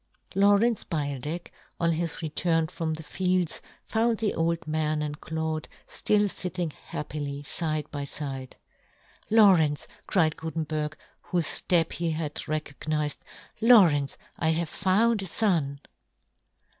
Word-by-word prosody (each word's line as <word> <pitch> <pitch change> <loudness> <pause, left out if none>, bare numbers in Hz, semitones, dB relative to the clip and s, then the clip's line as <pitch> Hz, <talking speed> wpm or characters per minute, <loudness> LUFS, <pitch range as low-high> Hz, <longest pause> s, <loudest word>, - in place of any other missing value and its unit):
Lawrence 205 +3 +4
Beildech, 150 +1 -3 0.3
on 170 -1 +2
his 165 +1 -2
return 165 +1 +1
from 160 0 -3
the 160 - -8
fields, 180 +1 0 0.2
found 225 0 +1
the 215 -2 0
old 165 0 0
man 155 0 0
and 150 0 -5
Claude 160 -1 -3 0.2
ftill 210 -1 +2
fitting 180 -3 -2
happily 145 -1 -6
fide 155 0 -1
by 145 -2 -4
fide. 135 -2 -5 0.4
" - - -31
Lawrence," 160 -8 +5 0.2
cried 160 -5 +2
Guten 160 0 -3
berg, 155 -1 -3 0.3
whofe 175 -3 +1 0.2
ftep 170 -3 +2
he 170 -1 -1
had 155 -2 -3
recognized, 150 -1 -3 0.2
" - - -30
Lawrence, 180 - +5 0.2
I 160 - +2
have 160 0 0
found 210 +5 +2
a 190 - -4
fon 165 -8 +1
160 Hz, 130 wpm, -27 LUFS, 150-180 Hz, 0.4 s, Lawrence